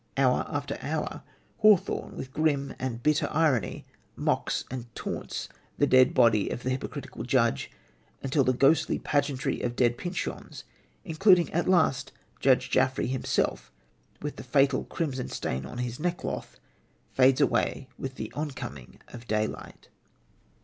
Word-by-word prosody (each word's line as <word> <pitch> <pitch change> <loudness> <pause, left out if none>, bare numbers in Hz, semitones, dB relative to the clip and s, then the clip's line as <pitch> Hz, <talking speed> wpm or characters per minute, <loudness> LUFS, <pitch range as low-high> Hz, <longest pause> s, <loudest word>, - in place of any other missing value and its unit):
Hour 130 -2 +3
after 145 -1 -3
hour, 155 +1 -3 0.4
Hawthorne, 215 -4 +3
with 130 0 -7
grim 145 -3 0
and 120 -2 -4
bitter 150 0 +2
irony, 145 - +1 0.3
mocks - - 0
and 125 -2 -5
taunts - - -4 0.3
the 145 - +4
dead 130 -2 +5
body 115 -5 +4
of 120 - -5
the 130 - -1
hypocritical 130 - -5
judge 65 - +1 0.5
until 135 +1 +2
the 130 - +3
ghostly 135 +5 +3
pageantry 140 -2 -1
of 120 -1 -2
dead 120 0 +2
Pyncheons 180 0 -5 0.4
including 180 0 +4
at 170 +3 +1
last 155 -7 +2 0.3
Judge 130 -1 +3
Jaffery 130 -2 +2
himself 130 -1 -1 0.5
with 150 - -4
the - - -7
fatal 135 +1 +2
crimson 135 -6 -3
stain 65 +1 -3
on - - -8
his 125 -1 -3
neckcloth 175 +2 -3 0.5
fades 130 +1 +4
away 140 -2 +1
with 135 -1 -5
the - - -6
oncoming 130 - -6
of 120 -1 -11
daylight. 110 0 -3
135 Hz, 135 wpm, -28 LUFS, 125-150 Hz, 0.5 s, dead